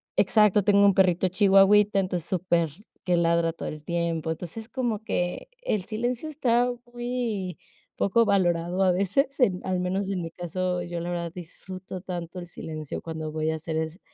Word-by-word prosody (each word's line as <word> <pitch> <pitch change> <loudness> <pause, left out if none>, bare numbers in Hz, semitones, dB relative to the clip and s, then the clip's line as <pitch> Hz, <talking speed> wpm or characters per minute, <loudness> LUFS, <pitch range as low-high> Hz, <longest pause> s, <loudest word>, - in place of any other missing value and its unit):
Exacto. 210 -2 +4
Tengo 200 0 +5
un 200 -2 +5
perrito 185 -1 +3
chihuahita 195 +1 +5
entonces 180 -3 -2
súper 175 -3 +1 0.3
que 180 -1 +2
ladra 170 -1 +2
todo - - -5
el 150 -1 -8
tiempo. 170 -1 -1
Entonces 170 +4 -6
es - - -25
como 235 -5 -2
que 180 - -2
el 215 - -1
silencio 240 +7 -2
está 245 -5 +2 0.2
muy 240 -6 -3 0.4
poco 230 +4 +3
valorado, 175 -2 +1
a 185 - +4
veces, 200 +11 +1
en 190 -8 +3
al 185 -1 0
menos 190 +2 -1
en 185 -3 -1
mi 165 - -4
caso, 180 +1 -2
yo 175 0 -4
la 170 +1 -4
verdad 170 -1 -3
disfruto 185 +1 -8
tanto 175 -1 -6
el 175 - -7
silencio 155 -3 -6
cuando 160 -1 -5
voy 155 0 -1
a - - -1
hacer 160 0 -5
es 160 +4 -3
185 Hz, 180 wpm, -26 LUFS, 170-205 Hz, 0.4 s, Tengo